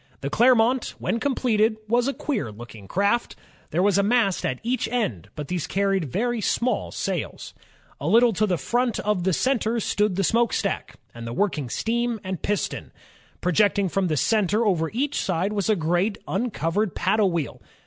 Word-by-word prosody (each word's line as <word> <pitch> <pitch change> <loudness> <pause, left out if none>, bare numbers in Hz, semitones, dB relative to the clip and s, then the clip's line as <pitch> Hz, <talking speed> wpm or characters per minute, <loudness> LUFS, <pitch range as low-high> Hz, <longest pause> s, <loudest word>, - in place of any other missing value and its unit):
The 140 - -3
Clermont, 245 +2 +3
when 230 - -1
completed, 225 -5 +1
was 240 +3 +2
a 275 - 0
queer 225 - -2
looking 110 -2 -11
craft. 200 - 0 0.3
There 175 +4 +1
was 200 0 +3
a - - +5
mast 205 -2 +2
at 130 - -2
each 240 -1 0
end, 215 - -2
but 150 -2 -5
these 180 -1 -2
carried 195 -3 +1
very 240 - -1
small 240 +5 0
sails. - - -4 0.5
A - - -4
little 235 +1 +5
to 215 +3 +1
the 180 -3 +1
front 240 +5 0
of 205 -4 0
the 190 - +3
center 235 +2 +1
stood 210 -2 0
the 195 - 0
smokestack 230 +4 0 0.2
and 115 0 -8
the 115 - -4
working 165 -8 -1 0.2
beam 235 0 0
and 185 -3 -4
piston. 205 0 -2 0.5
Pro 180 - +1
jecting 200 -1 +2
from 195 -2 +1
the 155 -3 0
center 215 - +2
over 165 -6 +1
each 275 +5 -1
side 185 +3 -1
was 200 0 -1
a 215 - +4
great 175 +5 0
imcov 195 -6 -2
ered 210 0 0
paddle 215 -3 +2
wheel. 165 -4 -3
205 Hz, 180 wpm, -24 LUFS, 180-235 Hz, 0.5 s, a